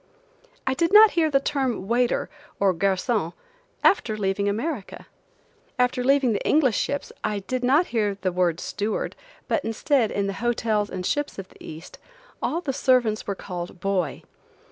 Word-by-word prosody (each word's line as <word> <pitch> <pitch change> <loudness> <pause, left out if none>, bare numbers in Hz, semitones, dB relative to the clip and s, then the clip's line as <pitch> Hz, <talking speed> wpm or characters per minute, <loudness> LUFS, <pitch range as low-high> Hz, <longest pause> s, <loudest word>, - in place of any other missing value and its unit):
I 265 - +1
did 335 +5 +1
not 425 +1 +9
hear 325 -2 +2
the 275 -2 +3
term 265 -8 -1
waiter, 240 +2 +1 0.3
or 195 -2 +3
garcon, 190 0 0 0.5
after 220 - +3
leaving 200 0 0
America. 230 +2 -4 0.7
After 250 0 +1
leaving 270 -2 +3
the 205 - -2
English 275 -7 +3
ships 285 - -2
I 210 -1 -1
did 255 +5 -3
not 285 +8 +4
hear 210 -3 +1
the 185 -1 -1
word 175 -2 +1
steward, 210 +1 -3 0.3
but - - 0
instead, 225 +1 +1
in 200 - -1
the 195 - -2
hotels 220 -3 0
and 185 -1 -5
ships 290 +5 -1
in 195 - -6
the - - -18
East, 160 +2 -10 0.4
all 335 - -1
the 275 -6 -2
servants 250 -5 +2
were 200 - -1
called 180 -1 -7
"boy." 195 -2 -1
225 Hz, 165 wpm, -24 LUFS, 195-270 Hz, 0.7 s, not